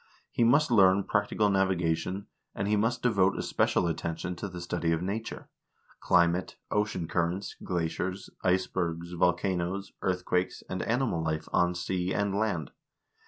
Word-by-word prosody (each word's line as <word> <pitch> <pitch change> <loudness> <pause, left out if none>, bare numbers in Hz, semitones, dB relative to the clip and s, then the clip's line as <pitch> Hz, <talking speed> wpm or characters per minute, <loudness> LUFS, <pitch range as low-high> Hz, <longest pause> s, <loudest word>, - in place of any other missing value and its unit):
He - - +1
must 125 +4 +4
learn 100 -3 +5
practical 105 +1 +1
navi 95 -2 +2
gation, 85 +4 -1 0.3
and 100 - -2
he 105 - +3
must 115 +4 0
devote 100 -6 +3
especial 90 - +1
attention 85 +2 -3
to 100 - -4
the 90 -2 -7
study 85 -1 -1
of 80 +1 0
nature: 110 +4 -4 0.5
climate, 85 +1 +2 0.2
ocean 105 -5 0
currents, 90 +4 -1
glaciers, 90 +2 -2
icebergs, 90 -2 0
volcanoes, 90 +2 0
earthquakes, 90 -1 -1
and 95 - -3
animal 115 -8 0
life 80 0 -2
on 90 0 +3
sea 90 +1 -2
and 100 -1 0
land. 100 -8 -1
90 Hz, 140 wpm, -29 LUFS, 85-100 Hz, 0.5 s, learn